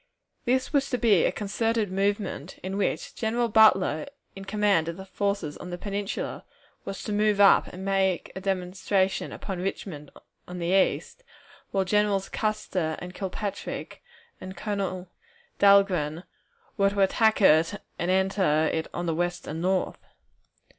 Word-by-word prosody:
This 260 +3 0
was 275 -1 +2
to 250 - 0
be 215 -8 +4
a - - +2
concerted 220 0 -1
movement, 195 -4 -2
in 190 +1 -4
which 200 - -1
General 235 +2 0
Butler, 210 - +4 0.3
in 195 0 -8
command 205 -5 +2
of 170 +1 -4
the 190 - -8
forces 200 -5 -2
on 180 - -8
the 175 - -5
Peninsula, 200 +1 -4 0.4
was 195 - -6
to 210 - -3
move 210 0 +2
up 200 -1 +6
and 185 +2 -8
make 190 -2 0
a 190 - -5
demonstration 190 0 -1
upon 190 -3 -5
Richmond 175 -5 -5 0.4
on 180 - -7
the 170 0 -2
east, 195 - +1 0.5
while 195 -1 0
Generals 205 0 +1
Custer 185 -7 -2
and 180 0 -8
Kilpatrick 200 +1 -5 0.4
and 185 0 -8
Colonel 190 -3 -3 0.5
Dahlgren 185 -6 +4 0.5
were 195 -1 +4
to 200 0 -1
attack 220 +3 +3
it 165 +1 +4 0.2
and 175 - -1
enter 185 -5 +2
on 175 - -2
the 165 - 0
west 175 +2 -2
and 160 +2 -5
north. 185 +1 0
195 Hz, 145 wpm, -26 LUFS, 180-205 Hz, 0.5 s, up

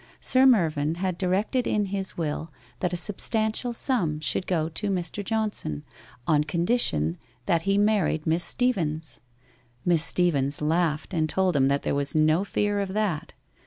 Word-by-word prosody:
Sir 260 +1 +4
Mervyn 160 - +2
had 185 0 -2
directed 195 +7 0
in 210 -1 +1
his 195 -1 -4
will 155 -1 -3 0.3
that 180 - -1
a 175 - -2
substantial 220 +5 +1
sum 210 - 0
should 155 +5 -1
go 160 -4 0
to 185 +6 -3
Mr. 190 +2 -3
Johnson 210 - -2 0.4
on 150 +1 +3
condition 155 - +1 0.3
that 170 -1 +2
he 200 - +3
married 205 -7 +1
Miss 165 +2 +2
Steevens. 165 - -1 0.7
Miss 170 -3 +3
Stee 175 +1 +2
vens 140 -1 +1
laughed 160 +2 0
and 155 -2 0
told 185 -1 +1
him 135 -1 +3
that 140 +1 0
there - - -1
was 140 +1 -1
no 155 +4 +3
fear 205 0 -1
of 195 -1 -3
that. 205 -8 -2
175 Hz, 160 wpm, -25 LUFS, 155-205 Hz, 0.7 s, Sir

